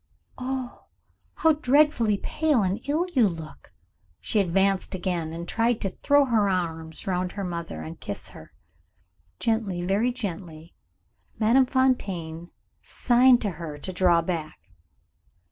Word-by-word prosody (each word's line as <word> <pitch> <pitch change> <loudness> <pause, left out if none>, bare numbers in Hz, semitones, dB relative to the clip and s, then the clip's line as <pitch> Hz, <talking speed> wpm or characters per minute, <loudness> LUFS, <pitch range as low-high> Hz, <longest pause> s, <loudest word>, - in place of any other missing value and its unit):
"Oh, 255 -1 -5 0.5
how 320 - +4
dreadfully 280 -7 +3
pale 300 -1 +1
and 190 +3 -1
ill 315 +5 +1
you 235 -7 +4
look!" 160 -4 -10 0.5
She 215 - -1
advanced 195 +1 +1
again, 175 -3 -2
and 170 +1 -6
tried 230 +2 +1
to 195 - -2
throw 285 +7 +3
her 220 -5 +2
arms 165 -3 -3
round 180 -1 -1
her 200 - -4
mother, 170 - -5
and 80 +1 -9
kiss - - -5
her. - - -13 0.9
Gently, 220 -6 -1
very 200 +7 +1
gently, 170 -8 -7 0.6
Madame 240 +4 +4
Fontaine 180 -11 -1 0.3
signed 245 0 +4
to 205 - -1
her 155 -3 -6
to 185 +6 -5
draw 175 -2 +3
back. 165 -3 -4
195 Hz, 130 wpm, -25 LUFS, 170-245 Hz, 0.9 s, how